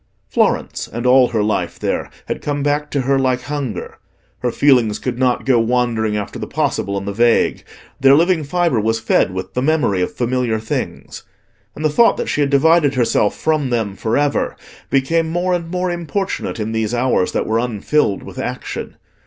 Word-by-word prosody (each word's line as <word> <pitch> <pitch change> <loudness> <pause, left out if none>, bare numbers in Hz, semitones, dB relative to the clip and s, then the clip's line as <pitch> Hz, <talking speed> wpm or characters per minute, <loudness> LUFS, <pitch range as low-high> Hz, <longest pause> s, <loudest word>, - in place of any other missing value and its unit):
Florence, - - 0
and 120 +2 -5
all 125 0 +6
her 110 -3 0
life 105 0 -1
there, - - -2 0.2
had - - -4
come 145 -1 -2
back 145 +1 0
to 140 - -1
her 135 +1 +1
like 130 -1 +1
hunger; 140 -10 -5 0.4
her 125 - 0
feelings 120 -5 +3
could 125 -1 -4
not 125 -2 +1
go 130 -3 +4
wandering 115 -2 0
after 105 - -5
the - - -5
possible 100 0 -1
and 100 0 -5
the 100 - -2
vague: 120 +2 +2 0.4
their 135 +1 +6
living 170 +1 +3
fibre 170 -4 +1
was 110 +1 0
fed 110 -4 +2
with 95 0 -6
the 125 - -1
memory 135 -10 +1
of 90 - -1
familiar 125 -2 -1
things. 110 - -5 0.5
And 155 - -4
the - - +4
thought 230 +10 +4
that - - -3
she 150 - 0
had 140 - +2
divided 145 +1 +4
herself 115 -4 +1
from 155 -4 0
them 110 -5 -1
for 110 +4 -1
ever 145 0 0 0.3
became 160 +5 +1
more 175 +2 0
and 170 -2 -2
more 180 0 -1
importunate 175 - -3
in 110 +1 -2
these 110 +1 -1
hours 120 -6 +1
that - - 0
were 110 +1 +1
unfilled 120 0 0
with - - -9
action. - - -5
130 Hz, 190 wpm, -18 LUFS, 115-150 Hz, 0.5 s, all